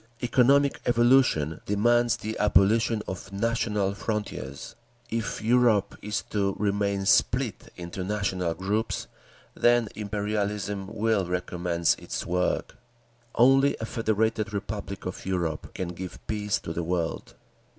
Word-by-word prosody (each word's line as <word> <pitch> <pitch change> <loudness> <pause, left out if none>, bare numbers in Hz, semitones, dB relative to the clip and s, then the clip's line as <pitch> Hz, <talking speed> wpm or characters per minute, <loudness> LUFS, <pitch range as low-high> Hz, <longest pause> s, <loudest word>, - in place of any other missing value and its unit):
Economic 135 +3 +3
evolution 120 - +3
demands 120 +3 +3
the 110 -1 -5
abolition 105 +2 +3
of 95 +1 -6
national 105 -2 0
frontiers. 100 - -4 0.4
If 110 -2 -3
Europe 115 -3 +3
is 105 0 -2
to 100 -2 0
remain 100 -1 0
split 120 +3 +2
into 90 +1 -5
national 95 -4 -1
groups, 105 +5 -2 0.5
then 120 -2 +3
Imperialism 105 -1 -2
will 110 -2 0
recommence 90 -1 0
its - - -5
work. 90 +1 -1 0.6
Only 135 +3 +5
a 110 - -3
Federated 110 -1 0
Republic 100 -1 -5
of 90 - -5
Europe 85 -5 -2
can 90 -2 -3
give 90 +1 -7
peace 105 -1 -1
to 80 - -5
the 85 - -2
world." 85 -1 -3
105 Hz, 120 wpm, -27 LUFS, 95-115 Hz, 0.6 s, Only